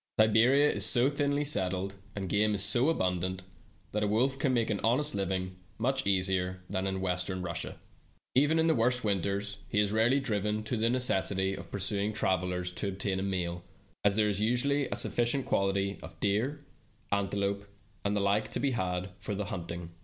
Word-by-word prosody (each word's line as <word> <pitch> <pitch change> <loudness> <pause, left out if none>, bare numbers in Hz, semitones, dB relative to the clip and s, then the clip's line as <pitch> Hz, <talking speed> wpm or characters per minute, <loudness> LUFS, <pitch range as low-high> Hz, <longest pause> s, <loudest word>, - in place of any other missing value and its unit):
Siberia 115 +7 +5
is - - 0
so 130 +2 +4
thinly 145 0 0
settled, 95 -8 0 0.2
and 100 -2 -3
game 105 +3 +2
is 95 - +2
so 115 +5 +4
abun 90 - 0
dant, 95 +1 -3 0.5
that 105 - -1
a 105 - +1
wolf 130 +6 +1
can 135 -1 +2
make 115 -3 +1
an 100 - -1
honest 130 +7 +2
living 95 -1 -2 0.2
much 130 +1 0
easier 95 -1 +1
than 95 +1 -1
in 95 0 -2
Western 90 0 -1
Russia. 85 -1 -4 0.6
Even 145 +5 +4
in 160 - +3
the 165 - +4
worst 125 0 +2
winters 100 0 -1
he 105 - +1
is 105 -1 +2
rarely 115 +5 +3
driven 105 -4 -1
to 110 +3 -2
the 115 +1 +1
necessity 95 -6 +1
of - - -8
pursu 100 +1 -1
ing 105 +2 -1
travelers 90 -3 0
to 95 +3 -4
obtain 95 0 -2
a - - -2
meal, 90 -3 -2 0.4
as 100 -1 +3
there 105 0 +3
is 100 -1 -1
usually 130 +5 +1
a - - -3
sufficient 120 +3 0
quantity 100 0 0
of 80 0 -11
deer, 125 +9 0 0.5
antelope, 100 0 -1 0.4
and 100 0 0
the - - +1
like 100 +2 +1
to - - -3
be 140 - +1
had 90 -4 -2
for 105 - -4
the 105 +1 -2
hunting. 85 -2 -6
100 Hz, 190 wpm, -30 LUFS, 95-120 Hz, 0.6 s, Siberia